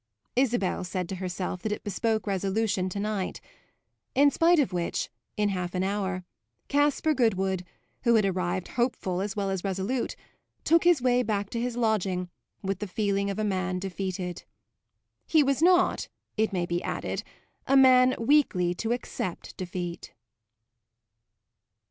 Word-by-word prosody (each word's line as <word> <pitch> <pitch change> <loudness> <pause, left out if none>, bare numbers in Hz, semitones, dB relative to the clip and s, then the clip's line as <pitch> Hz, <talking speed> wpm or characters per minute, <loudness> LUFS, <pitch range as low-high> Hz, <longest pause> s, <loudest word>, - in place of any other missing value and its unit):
Isabel 240 -9 +1
said 180 -1 -3
to 190 - -4
herself 180 0 -4
that 220 - -2
it 210 - -3
bespoke 215 +1 -1
resolution 195 0 0
to 200 - -4
night; 205 -2 -2 0.8
in 285 +1 +6
spite 335 +5 +4
of 275 -10 +2
which, 175 -1 -2 0.3
in 210 -1 +2
half 180 -2 -3
an 180 - +1
hour, 190 -2 -1 0.5
Caspar 290 +2 +2
Goodwood, 190 -7 +1 0.4
who 235 -1 +4
had 215 -2 +4
arrived 185 -1 -1
hopeful 235 -7 -1
as 200 0 -3
well 200 -2 -1
as 190 -2 -2
resolute, 195 +6 -1 0.5
took 335 +1 +4
his 345 -8 +5
way 250 -1 +4
back 205 -4 -2
to 235 - -2
his 245 0 -2
lodging 195 -6 0 0.3
with 195 -1 -2
the 210 - -3
feeling 200 0 0
of 200 - -3
a 215 - 0
man 185 -2 -1
defeated. 185 -1 -4 0.8
He 315 -2 +5
was 275 +1 +1
not, 360 +1 +4 0.3
it 220 0 +1
may 180 -3 0
be 175 0 -1
added, - - -3 0.5
a 275 - +5
man 255 -1 +6
weakly 230 -9 +3
to 225 +6 -1
accept 185 -7 -5
defeat. 175 -1 -5
200 Hz, 150 wpm, -27 LUFS, 185-245 Hz, 0.8 s, in